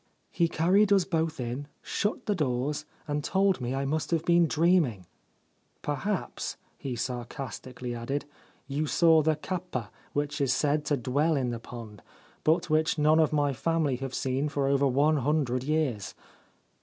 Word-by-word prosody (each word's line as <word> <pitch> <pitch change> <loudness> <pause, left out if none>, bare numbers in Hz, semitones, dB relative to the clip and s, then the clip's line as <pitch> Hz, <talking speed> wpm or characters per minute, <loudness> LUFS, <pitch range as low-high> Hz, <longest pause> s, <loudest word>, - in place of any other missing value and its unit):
He 170 - +2
carried 190 +6 +3
us 195 -3 +5
both 160 -3 -1
in, 125 +4 -4 0.2
shut 210 +1 -2
the 210 - +1
doors, 145 -2 -1 0.2
and 145 0 -1
told 190 -1 +2
me 125 +2 -2
I 135 +1 -1
must 155 +3 -1
have 165 -2 0
been 170 -1 +5
dreaming. 160 - +2 0.4
" - - -42
Perhaps," 180 +8 -2 0.2
he 130 -3 -5
sarcastically 125 0 -5
added, 120 +5 -3 0.2
" - - -34
you 155 +1 0
saw 160 0 +5
the 155 +1 +2
kappa 155 - -4 0.2
which 145 0 -1
is 135 -2 +3
said 150 +2 +1
to 145 -1 +1
dwell 140 +6 +1
in 130 -3 0
the 115 - -4
pond, 115 -4 -10 0.4
but 170 +3 +2
which 155 0 +2
none 155 +1 +4
of 155 -1 +3
my 145 -2 +2
family 150 +1 0
have 135 0 -5
seen 135 +3 0
for 145 -1 -1
over 140 0 +3
one 145 +4 +3
hundred 135 -3 0
years." 145 -8 -1
145 Hz, 170 wpm, -28 LUFS, 130-160 Hz, 0.4 s, us